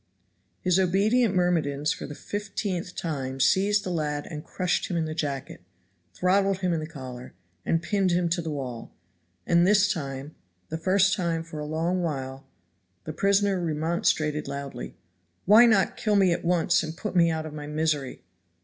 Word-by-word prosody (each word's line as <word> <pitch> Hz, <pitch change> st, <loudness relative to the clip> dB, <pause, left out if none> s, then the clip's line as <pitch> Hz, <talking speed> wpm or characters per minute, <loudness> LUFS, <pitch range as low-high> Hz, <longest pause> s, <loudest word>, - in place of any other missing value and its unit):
His 180 Hz, 0 st, +2 dB
obedient 200 Hz, +4 st, +2 dB
myrmidons 155 Hz, -5 st, +1 dB
for -, -, -7 dB
the 145 Hz, -, -8 dB
fiftieth 195 Hz, -3 st, -4 dB
time 135 Hz, -5 st, -4 dB
seized 200 Hz, +9 st, +3 dB
the 185 Hz, -, -3 dB
lad 150 Hz, -3 st, -2 dB
and 150 Hz, -1 st, -6 dB
crushed 180 Hz, -1 st, -1 dB
him 175 Hz, -, -2 dB
in 165 Hz, -, 0 dB
the 155 Hz, -, -4 dB
jacket, 140 Hz, -, -4 dB, 0.5 s
throttled 195 Hz, +1 st, +2 dB
him 180 Hz, -2 st, +1 dB
in 165 Hz, -, 0 dB
the 155 Hz, -, -5 dB
collar, 130 Hz, -5 st, -9 dB, 0.3 s
and 165 Hz, 0 st, +1 dB
pinned 195 Hz, +1 st, +1 dB
him 175 Hz, 0 st, +2 dB
to 170 Hz, +1 st, 0 dB
the 160 Hz, -, -5 dB
wall, 130 Hz, -6 st, -5 dB, 0.5 s
and 170 Hz, 0 st, +4 dB
this 205 Hz, 0 st, +4 dB
time, 140 Hz, -3 st, -6 dB, 0.4 s
the 160 Hz, -, -3 dB
first 190 Hz, +2 st, +3 dB
time 170 Hz, -4 st, -1 dB
for 160 Hz, -2 st, -8 dB
a 150 Hz, -, -4 dB
long 165 Hz, +4 st, -1 dB
while, 135 Hz, -4 st, -4 dB, 0.6 s
the -, -, -6 dB
prisoner 200 Hz, -1 st, +2 dB
remonstrated 155 Hz, -1 st, 0 dB
loudly. 140 Hz, -2 st, -6 dB, 0.5 s
"Why 220 Hz, +5 st, +8 dB
not 200 Hz, -5 st, +2 dB
kill 210 Hz, -1 st, +1 dB
me 190 Hz, -3 st, +4 dB
at -, -, -4 dB
once 170 Hz, -1 st, +2 dB
and 160 Hz, +1 st, -6 dB
put 215 Hz, -1 st, -5 dB
me 170 Hz, -1 st, +5 dB
out 160 Hz, -1 st, -2 dB
of 155 Hz, -, -7 dB
my 150 Hz, -1 st, -7 dB
misery!" 150 Hz, -3 st, -2 dB
170 Hz, 175 wpm, -26 LUFS, 150-190 Hz, 0.6 s, Why